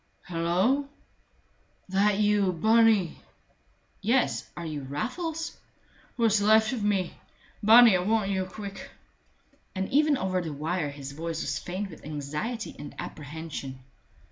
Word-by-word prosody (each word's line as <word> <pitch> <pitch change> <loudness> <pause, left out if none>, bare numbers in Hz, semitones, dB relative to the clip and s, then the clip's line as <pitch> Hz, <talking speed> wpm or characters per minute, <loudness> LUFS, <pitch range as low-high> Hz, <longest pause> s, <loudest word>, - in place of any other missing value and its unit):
"Hulloa!" 180 +12 +1 1.0
"That 195 +2 +3
you, 205 -3 +2
Bunny?" 220 0 +3 0.8
"Yes 240 +5 +1
are 170 - -5
you 155 -3 -4
Raffles?" 310 - -4 0.6
"What's 220 -3 +3
left 220 +3 +4
of 230 -5 -3
me! 195 -4 0 0.5
Bunny, 225 0 +8
I - - +2
want 205 +1 +1
you 190 -1 0
quick." 200 +1 -8 0.9
And 190 0 -1
even 295 0 +3
over 185 -3 -1
the 160 -3 -5
wire 155 +2 -2
his 140 -1 -8
voice 165 +2 -4
was 140 -1 -2
faint 190 +2 -5
with 160 - -13
anxiety 150 - -4
and 145 - -8
apprehension. 150 -2 -7
190 Hz, 125 wpm, -27 LUFS, 160-220 Hz, 1.0 s, Bunny